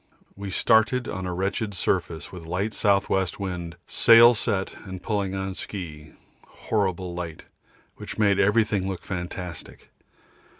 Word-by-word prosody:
We 100 Hz, 0 st, -6 dB
started 110 Hz, +5 st, +3 dB
on 95 Hz, 0 st, -4 dB
a -, -, -2 dB
wretched 100 Hz, +2 st, -2 dB
surface 85 Hz, -4 st, -1 dB
with 85 Hz, -3 st, -9 dB
light 100 Hz, +6 st, -2 dB
S.W. 100 Hz, -2 st, +2 dB
wind, 90 Hz, -3 st, -5 dB
sail 115 Hz, +1 st, +7 dB
set, 105 Hz, -4 st, -1 dB
and 95 Hz, -2 st, -7 dB
pulling 100 Hz, -2 st, -1 dB
on 95 Hz, 0 st, -3 dB
ski 80 Hz, -6 st, -7 dB, 0.3 s
horrible 95 Hz, -4 st, -2 dB
light, 85 Hz, -2 st, -6 dB, 0.5 s
which -, -, -7 dB
made 100 Hz, -3 st, +3 dB
everything 105 Hz, -2 st, +2 dB
look 95 Hz, -, -5 dB
fantastic. 90 Hz, -2 st, -6 dB
95 Hz, 130 wpm, -25 LUFS, 90-105 Hz, 0.5 s, sail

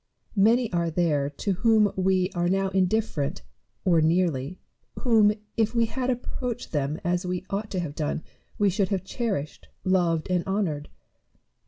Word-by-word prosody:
Many 225 Hz, +2 st, +4 dB
are 170 Hz, -1 st, +1 dB
there 155 Hz, -4 st, +1 dB
to 150 Hz, +7 st, -3 dB
whom 215 Hz, +1 st, +3 dB
we 185 Hz, 0 st, +2 dB
are 175 Hz, 0 st, 0 dB
now 195 Hz, +1 st, +1 dB
indifferent, 190 Hz, -4 st, 0 dB, 0.4 s
or 170 Hz, -4 st, +4 dB
nearly, 165 Hz, -2 st, +1 dB, 0.4 s
whom, 220 Hz, -5 st, +5 dB, 0.3 s
if 225 Hz, +1 st, +1 dB
we 230 Hz, 0 st, +4 dB
had 255 Hz, +3 st, -2 dB
approached 245 Hz, -1 st, -3 dB
them 145 Hz, 0 st, -1 dB
as 175 Hz, +1 st, 0 dB
we 180 Hz, 0 st, -3 dB
ought 205 Hz, +2 st, -2 dB
to 190 Hz, -, -2 dB
have 155 Hz, -4 st, -4 dB
done, 155 Hz, +1 st, -2 dB, 0.3 s
we 205 Hz, -3 st, +3 dB
should 195 Hz, 0 st, 0 dB
have 190 Hz, -3 st, -1 dB
cherished, 190 Hz, -, -3 dB, 0.2 s
loved, 175 Hz, -4 st, +1 dB
and 180 Hz, -1 st, +2 dB
honoured. 180 Hz, -7 st, -1 dB
185 Hz, 155 wpm, -26 LUFS, 165-210 Hz, 0.4 s, whom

